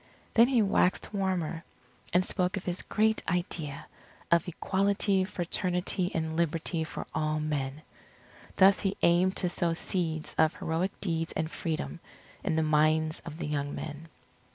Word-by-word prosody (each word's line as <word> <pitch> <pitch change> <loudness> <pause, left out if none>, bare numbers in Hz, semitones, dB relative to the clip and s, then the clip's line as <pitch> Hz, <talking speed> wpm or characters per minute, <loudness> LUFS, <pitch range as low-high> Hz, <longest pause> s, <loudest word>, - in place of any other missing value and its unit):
Then 230 +1 +7
he 250 -4 +3
waxed 195 0 +1
warmer, 180 -4 -1 0.5
and 180 +1 +3
spoke 185 0 0
of 190 - -6
his 180 0 0
great 220 0 +1
idea 170 -5 -2 0.5
of 170 0 +4
Equality, 195 +2 +1
Fraternity, 180 0 0
and 160 -1 -1
Liberty 165 0 0
for 160 - -6
all 155 0 0
men. 150 -1 -3 0.7
Thus 195 0 +6
he 195 -1 -1
aimed 180 +2 +4
to 180 - +1
sow 175 -1 0
seeds 165 -2 -1
of 160 -1 +4
heroic 165 +4 -2
deeds 165 -3 -1
and 160 0 -2
Freedom, 155 - -3 0.4
in - - 0
the 160 - +2
minds 155 +1 +2
of 160 -1 -7
the - - -4
young 145 -1 -2
men. 155 +1 -7
170 Hz, 150 wpm, -29 LUFS, 155-185 Hz, 0.7 s, Then